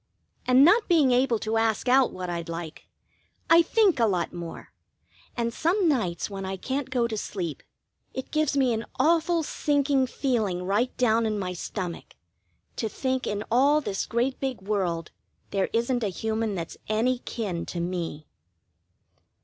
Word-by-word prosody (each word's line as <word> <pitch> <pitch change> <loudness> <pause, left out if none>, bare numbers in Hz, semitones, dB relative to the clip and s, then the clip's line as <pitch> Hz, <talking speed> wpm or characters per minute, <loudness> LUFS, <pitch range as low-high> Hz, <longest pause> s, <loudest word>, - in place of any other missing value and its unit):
And 255 +2 +7
not 430 +7 +5
being 310 -7 +4
able 250 -1 +3
to 220 +1 -1
ask 225 +2 +1
out 260 +1 +5
what 185 0 -5
I'd 170 -1 -4
like, 165 -1 -7 0.6
I 335 +1 +9
think 380 - +3
a 230 - +4
lot 180 -4 -1
more, 170 -1 -8 0.6
and 235 -1 -1
some 350 - +1
nights 205 - 0
when 195 -1 -6
I 190 0 -4
can't 265 +7 -3
go 250 -3 +1
to 225 - -4
sleep, 180 -6 -4 0.5
it 260 - -6
gives 305 -2 +1
me 260 -3 +3
an 225 +1 -3
awful 330 +1 +3
sinking 285 -3 +1
feeling 220 -10 -1
right 210 +7 0
down 230 -2 +3
in 215 -1 -1
my 185 -2 -3
stomach, 180 0 -6 0.6
to 220 - -1
think 260 +4 -2
in 205 0 -2
all 280 +5 +4
this 200 -10 -3
great 245 +3 0
big 260 -7 -3
world 185 -5 -1 0.4
there 195 -1 0
isn't 235 +1 0
a - - +1
human 220 +2 -2
that's 165 -3 -5
any 240 +4 +1
kin 195 -9 -4
to 175 - -4
me. 170 -3 -3
230 Hz, 165 wpm, -26 LUFS, 190-265 Hz, 0.6 s, I